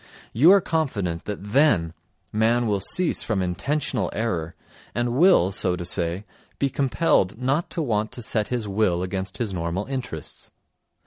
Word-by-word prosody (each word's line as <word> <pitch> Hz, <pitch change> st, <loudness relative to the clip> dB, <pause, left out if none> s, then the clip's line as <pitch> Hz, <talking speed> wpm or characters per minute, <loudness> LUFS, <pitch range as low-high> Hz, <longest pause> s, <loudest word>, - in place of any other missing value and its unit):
You 145 Hz, +9 st, +5 dB
are 200 Hz, 0 st, +6 dB
confident 105 Hz, -, -2 dB
that 105 Hz, 0 st, -6 dB
then 105 Hz, -, +3 dB, 0.4 s
man 115 Hz, +3 st, +2 dB
will 105 Hz, -3 st, 0 dB
cease 170 Hz, -, +3 dB
from 110 Hz, -4 st, -1 dB
intentional 125 Hz, -, -2 dB
error 90 Hz, -8 st, -2 dB, 0.4 s
and 120 Hz, 0 st, 0 dB
will, 155 Hz, -, +5 dB
so 90 Hz, -1 st, +1 dB
to 90 Hz, -1 st, -5 dB
say, 90 Hz, +2 st, 0 dB, 0.3 s
be 140 Hz, -1 st, 0 dB
compelled 135 Hz, -, +1 dB
not 135 Hz, +6 st, 0 dB
to 165 Hz, -, -3 dB
want 110 Hz, -4 st, -1 dB
to 120 Hz, -, -5 dB
set 110 Hz, -1 st, 0 dB
his 120 Hz, -4 st, -3 dB
will 95 Hz, -3 st, 0 dB
against 95 Hz, +1 st, -4 dB
his 110 Hz, -5 st, -3 dB
normal 85 Hz, +3 st, -3 dB
interests. 125 Hz, -, -6 dB
110 Hz, 155 wpm, -24 LUFS, 90-130 Hz, 0.4 s, are